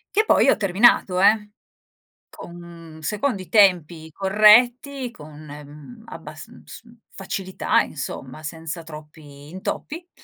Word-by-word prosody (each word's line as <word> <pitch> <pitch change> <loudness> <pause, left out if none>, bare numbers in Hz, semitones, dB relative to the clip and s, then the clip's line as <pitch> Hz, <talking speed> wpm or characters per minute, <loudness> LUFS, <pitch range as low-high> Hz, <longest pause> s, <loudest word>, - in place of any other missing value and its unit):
Che 430 - +3
poi - - +3
ho - - +3
terminato, 195 -2 +2
eh, 210 +1 +3 0.8
con 170 -2 -13
secondo 210 - -2
i 185 - -11
tempi 175 -6 +2
corretti, 240 - +3
con, 155 -4 -14
ehm, 150 +10 -13
abbas - - -11
uhm, - - -17
s - - -12 0.3
facilità 190 -1 -2
insomma, 135 0 -8
senza 160 +1 -7
troppi 150 -2 -13
intoppi. 305 - -7
180 Hz, 115 wpm, -22 LUFS, 155-210 Hz, 0.8 s, Che